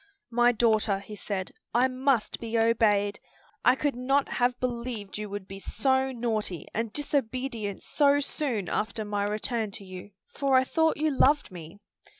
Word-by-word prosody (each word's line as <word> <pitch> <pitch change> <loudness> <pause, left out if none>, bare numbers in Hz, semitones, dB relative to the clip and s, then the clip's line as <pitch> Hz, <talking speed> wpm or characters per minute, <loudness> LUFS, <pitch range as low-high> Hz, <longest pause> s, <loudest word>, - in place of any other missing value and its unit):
"My 240 +1 +4
daughter," 220 -3 +2
he 200 +2 -9
said, 195 -2 -4 0.2
"I 250 +2 +5
must 255 -3 0
be 230 0 -2
obeyed. 210 -3 +2 0.4
I 250 - +6
could 290 +1 0
not 270 +3 +1
have 245 0 +1
believed 235 -5 -4
you 210 -1 -5
would 200 -1 -6
be 195 0 -8
so 265 +5 +1
naughty 220 - -2
and 225 -1 -2
disobedient 255 -6 -2
so 285 -1 +3
soon 265 -8 -2
after 220 0 -2
my 205 -1 -1
return 215 +1 -1
to 200 - -5
you, 185 +1 -9 0.2
for 275 -2 +1
I 260 - +5
thought 320 +4 +1
you 310 +1 +1
loved 280 -2 +3
me." 175 +2 -10
230 Hz, 160 wpm, -28 LUFS, 205-265 Hz, 0.4 s, I